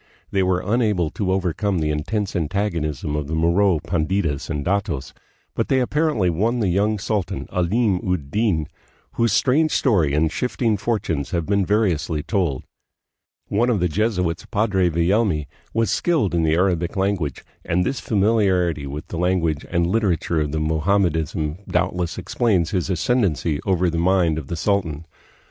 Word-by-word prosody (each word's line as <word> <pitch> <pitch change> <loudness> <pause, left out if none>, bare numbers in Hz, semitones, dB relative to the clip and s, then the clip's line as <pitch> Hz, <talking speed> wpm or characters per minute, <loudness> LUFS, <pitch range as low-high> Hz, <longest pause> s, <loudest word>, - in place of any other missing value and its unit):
They 95 - +1
were 90 -1 +1
unable 105 -7 +1
to 95 0 -2
overcome 95 +1 0
the 75 -2 0
intense 95 +7 -2
antagonism 80 -5 -2
of 75 -2 -2
the 80 - -2
Moro 85 +3 +3
panditas 80 -2 -1
and 75 -3 -3
datos, 95 -7 -1 0.4
but - - -1
they 135 - +2
apparently 135 - +1
won 105 +9 +1
the 105 -5 +1
young 105 +4 +1
sultan, 100 -2 -2
Alim 95 +3 +1
ud 75 -6 -3
Din, 95 -8 +1 0.4
whose 115 -2 +1
strange 145 +9 +3
story 85 - +2
and 80 +1 +2
shifting 120 +1 0
fortunes 100 -9 -2
have 85 -2 -1
been 100 +1 +1
variously 85 -7 +1
told. 90 - -1 0.8
One 120 +5 +1
of 115 -5 +2
the 90 - +2
Jesuits, 90 -2 -1
Padre 100 -4 +1
Villelmi, 85 -1 +1 0.3
was 115 0 +1
skilled 155 - +1
in 85 - +2
the 80 0 +2
Arabic 90 0 +1
language, 95 -8 -1 0.2
and 90 +2 0
this 135 -1 -1
familiarity 95 -8 +1
with 75 +2 -6
the 85 - -4
language 85 -4 0
and 85 -1 +1
literature 85 -5 0
of 75 -1 -2
Mo 80 +1 0
hammedanism 80 -3 0
doubtless 90 -1 -1
explains 100 -9 0
his 90 -2 -1
ascendency 85 - 0
over 90 -1 +2
the 85 -1 -1
mind 85 -3 +2
of 70 - -9
the 85 - -3
sultan. 85 -4 -1
90 Hz, 160 wpm, -22 LUFS, 80-105 Hz, 0.8 s, Moro